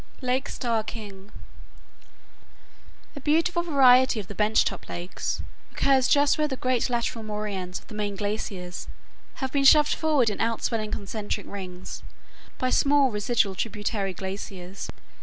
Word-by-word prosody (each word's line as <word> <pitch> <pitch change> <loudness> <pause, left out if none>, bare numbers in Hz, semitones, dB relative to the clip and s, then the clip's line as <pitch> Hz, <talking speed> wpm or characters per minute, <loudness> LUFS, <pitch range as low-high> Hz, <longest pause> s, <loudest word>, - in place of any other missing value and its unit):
LAKE 255 +1 0
STARR 230 -3 -1
KING 205 -3 -9 1.8
A - - -6
beautiful 330 +4 +2
variety 260 -7 +5
of 205 - -5
the 205 - -7
bench 210 +2 +3
top - - -4
lakes 175 +2 -4 0.3
occurs 265 -2 +3
just 285 +1 +4
where 305 - +2
the 265 -3 -4
great 255 -1 +1
lateral 235 -1 -1
moraines 210 -4 -4
of - - -11
the - - -12
main 205 -1 -2
glaciers 195 -3 -4 0.5
have 265 -1 -3
been 280 0 +1
shoved 300 +2 +7
forward 290 -8 +2
in 205 - -6
outswelling 225 -1 -1
concentric 205 +1 -4
rings 185 -2 -7 0.6
by 255 0 0
small 280 -2 +4
residual 210 -1 +1
tributary 205 -1 -2
glaciers. 190 -1 -6
220 Hz, 140 wpm, -26 LUFS, 200-265 Hz, 1.8 s, shoved